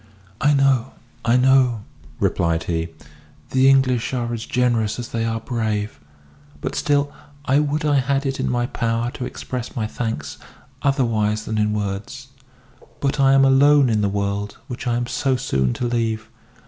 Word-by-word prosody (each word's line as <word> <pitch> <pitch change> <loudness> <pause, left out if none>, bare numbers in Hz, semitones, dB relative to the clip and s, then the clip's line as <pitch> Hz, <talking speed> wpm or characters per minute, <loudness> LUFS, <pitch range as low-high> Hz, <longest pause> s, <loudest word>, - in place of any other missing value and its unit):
"I 145 +1 +4
know 135 -3 +2 0.3
I 115 +1 +3
know," 125 -4 +3 0.4
replied 85 -1 +1
he, 80 -1 -2 0.6
"the 130 +1 +5
English 130 -2 +2
are 120 -1 -2
as 115 -1 -5
generous 120 -4 +1
as 120 -1 -6
they 115 -1 -2
are 115 0 -1
brave; 110 - -2 0.6
but - - -4
still 145 -1 +1 0.3
I 135 +1 +3
would 150 +1 -1
I 145 -1 +3
had 135 +2 0
it 135 0 -2
in - - 0
my 120 -1 0
power 115 0 -1
to 125 - -5
express 125 -1 -6
my 110 - -1
thanks 110 -11 -4 0.4
otherwise 110 -6 +1
than 110 -1 -2
in 105 0 +2
words. 105 +6 -4 0.7
But 140 +1 -1
I 135 0 +5
am 135 0 +6
alone 140 0 +5
in 110 -1 +1
the 100 - +1
world 100 +1 -2
which 125 0 -6
I 120 - +1
am 120 0 -1
so 130 +2 0
soon 65 - 0
to 125 - -3
leave. 115 -2 -1
120 Hz, 170 wpm, -21 LUFS, 110-135 Hz, 0.7 s, am